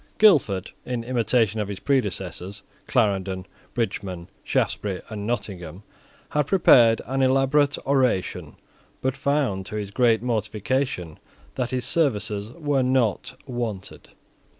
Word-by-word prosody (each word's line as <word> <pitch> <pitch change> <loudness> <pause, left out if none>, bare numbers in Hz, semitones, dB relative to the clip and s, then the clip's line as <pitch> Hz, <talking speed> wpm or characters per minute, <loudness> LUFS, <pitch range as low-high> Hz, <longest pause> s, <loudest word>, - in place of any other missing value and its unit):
Guildford, 125 - +4
in 125 -2 -3
imitation 115 -3 +1
of 105 - -1
his 100 -2 -6
predecessors, 100 -6 -1 0.2
Clarendon, 95 -2 0 0.3
Bridgeman, 95 -6 -3
Shaftesbury, 95 -3 -1
and 105 -2 -5
Nottingham, 95 -6 -4 0.5
had 150 -1 0
prepared 120 -11 +5
an 135 +2 -1
elaborate 135 +2 +3
oration, 130 -9 0 0.5
but 130 0 0
found, 135 -9 0
to - - -6
his 105 -2 -4
great 115 0 +3
mortification, 110 - -2 0.3
that 125 -2 -2
his 125 -1 -2
services 105 -8 0
were 145 -3 0
not 125 -5 +1
wanted. 115 -6 -5
115 Hz, 115 wpm, -24 LUFS, 100-130 Hz, 0.5 s, prepared